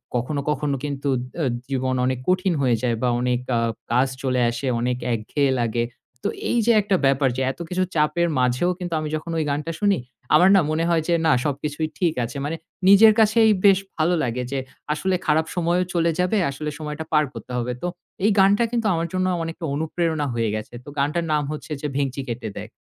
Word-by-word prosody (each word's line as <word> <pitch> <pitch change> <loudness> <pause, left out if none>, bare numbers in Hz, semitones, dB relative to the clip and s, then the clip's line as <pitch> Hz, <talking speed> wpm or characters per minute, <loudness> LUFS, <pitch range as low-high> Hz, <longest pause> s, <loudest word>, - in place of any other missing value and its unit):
কখনো, 135 +4 -1
কখনো 150 -1 0
কিন্তু 140 -1 -2 0.3
আ - - +1 0.3
জীবন 130 -1 0
অনেক 130 -1 0
কঠিন 185 0 +2
হয়ে 125 -3 +3
যায় 120 -2 +1
বা 125 - +2
অনেক 125 -1 +1 0.2
আ - - +2 0.3
কাজ 125 +3 +3 0.2
চলে 130 -1 +1
আসে 120 +3 -4
অনেক 125 0 0 0.2
একঘেয়ে 135 +5 0
লাগে। 115 0 0 0.4
তো - - +1 0.2
এই - - +1
যে 235 - +5
একটা 200 -1 +1
ব্যাপার 135 0 +3
যে - - -1
এত 135 - -15
কিছু 185 +1 0
চাপের 170 +3 +2
মাঝেও 125 +7 +2
কিন্তু 175 -2 -4
আমি 155 -1 -3
যখন 160 +2 -5
ওই 160 - +1
গানটা 150 +3 -2
শুনি 200 -5 +3 0.4
আমার 185 +2 +6
না 190 - +6
মনে 160 +1 0
হয় 165 -1 +3
যে 175 - +2
না 155 - +5
সবকিছুই 150 +2 -2
ঠিক 170 -4 +2
আছে। 120 +3 -5
মানে 160 +3 -2 0.3
নিজের 215 +2 +8
কাছেই 220 0 +5
বেশ 195 -1 +7 0.2
ভালো 165 +2 +2
লাগে 125 +1 -2
যে 135 - -1 0.3
আসলে 185 +4 0
খারাপ 155 +1 +2
সময়ও 175 +1 +1
চলে 170 -1 +2
যাবে। 180 +4 +2
আসলে 150 +2 -4
সময়টা 150 +1 -5
পার 150 0 +5
করতে - - -9
হবে। 125 0 -2
তো 180 - -2 0.4
এই 215 - +5
গানটা 200 +4 +5
কিন্তু 230 -3 0
আমার 165 0 -1
জন্য 185 0 +1 0.2
অনেকটা 165 0 -5
অনুপ্রেরণা 160 0 -1
হয়ে 115 -2 0
গেছে। 110 +2 -6
তো - - -9
গানটার 150 +5 0
নাম 150 -1 +1
হচ্ছে 155 +1 -7
যে, 150 - -2
ভেংচি 140 -1 -1
কেটে 115 -2 -4
দেখ। - - -7
150 Hz, 205 wpm, -23 LUFS, 130-175 Hz, 0.4 s, নিজের